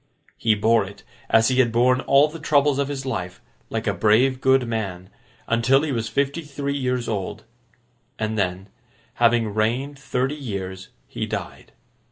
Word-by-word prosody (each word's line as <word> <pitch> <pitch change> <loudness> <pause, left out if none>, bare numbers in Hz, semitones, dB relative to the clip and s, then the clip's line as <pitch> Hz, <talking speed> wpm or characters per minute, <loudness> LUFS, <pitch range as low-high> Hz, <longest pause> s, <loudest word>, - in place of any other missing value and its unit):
He 110 -2 +2
bore 110 +2 +3
it, 100 +1 -11 0.3
as 115 +2 +4
he 130 0 +1
had 120 -3 +4
borne 125 +2 +3
all 140 +2 +4
the 160 +2 -9
troubles 145 -2 +2
of 140 - +1
his 135 -2 -5
life, 95 -9 -4 0.3
like - - -3
a - - +1
brave 125 +5 +3
good 130 -2 +3
man, 95 -6 -4 0.4
until 120 +5 +3
he 155 - -1
was 115 -3 -2
fifty 140 +5 -1
three 140 -2 -4
years 125 -3 -1
old; 105 0 -4 0.7
and 110 0 -2
then, 95 -1 -2 0.5
having 115 -3 +3
reigned 125 +7 -1
thirty 135 0 -1
years, 100 -10 -6 0.2
he - - -4
died. - - -6
120 Hz, 165 wpm, -23 LUFS, 110-135 Hz, 0.7 s, as